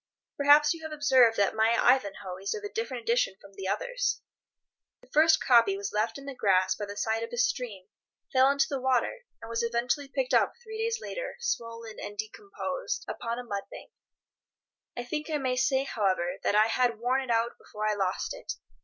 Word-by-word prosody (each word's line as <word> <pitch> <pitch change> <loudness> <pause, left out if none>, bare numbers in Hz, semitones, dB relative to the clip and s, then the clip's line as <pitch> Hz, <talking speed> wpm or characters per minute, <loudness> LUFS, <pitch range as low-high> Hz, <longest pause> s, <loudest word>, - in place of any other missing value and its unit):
Perhaps 290 +2 +6
you 330 - -10
have 315 0 -6
observed 265 -6 +4
that 200 -1 +2
my 220 +1 +3
"Ivanhoe" 200 -7 +1
is 195 - -2
of 425 - -7
a 410 - -6
different 450 0 -3
edition 470 - +1
from 200 - -16
the 195 -1 -6
others. - - -1 0.8
The - - -20
first 315 +1 +5
copy 230 -6 +4
was 200 0 -5
left 215 +5 0
in 275 - -11
the 280 - -5
grass 190 -5 +2
by 205 - -5
the 205 0 -8
side 225 +1 0
of 230 - -5
a - - -5
stream, 250 - -1 0.5
fell 260 0 +6
into 280 0 +3
the 275 -2 -3
water, 265 - 0 0.2
and - - -7
was 230 0 -1
eventually 240 +4 -1
picked - - -2
up - - +4
three 440 -1 -8
days 455 0 -1
later, - - -5
swollen 230 - -4
and 205 0 -7
decomposed, 405 - -4
upon 235 0 -4
a 250 - -5
mud 200 -4 -4
bank. - - -11 1.1
I 245 - -2
think 300 +5 -4
I 305 - 0
may 260 -3 -1
say, 265 +1 +2
however, 190 -8 -1
that - - +1
I 215 +1 +6
had 235 0 +1
worn 250 +4 +1
it 260 - -7
out 230 0 0
before 215 0 -4
I 215 - +2
lost 190 -2 -1
it. - - -6
245 Hz, 205 wpm, -28 LUFS, 215-300 Hz, 1.1 s, Perhaps